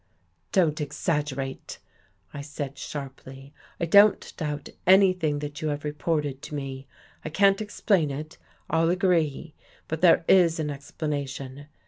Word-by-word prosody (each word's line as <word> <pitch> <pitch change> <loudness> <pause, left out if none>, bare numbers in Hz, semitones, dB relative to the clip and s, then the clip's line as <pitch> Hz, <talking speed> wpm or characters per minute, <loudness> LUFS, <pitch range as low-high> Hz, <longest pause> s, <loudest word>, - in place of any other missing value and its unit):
" 85 -2 -45
Don't 165 -4 +2
exaggerate," 145 -3 -3 0.6
I 145 - -6
said 145 -1 -6
sharply. 135 -1 -8
" - - -30
I 170 - 0
don't 200 +5 +5
doubt 150 -2 -4 0.2
anything 185 -5 +4
that 145 +2 -7
you 155 - -1
have 145 -1 -3
reported 150 -2 -2
to 150 - -7
me. 135 -1 -6 0.4
I - - -4
can't 195 +5 +3
explain 200 -6 +1
it. 150 +4 -7 0.3
I'll 165 0 +2
agree. 170 -4 +1 0.3
But 160 0 -4
there 170 -2 +5
is 170 -3 +5
an 150 -1 -1
explana 145 0 -4
tion. 135 +1 -8
150 Hz, 145 wpm, -26 LUFS, 140-170 Hz, 0.6 s, don't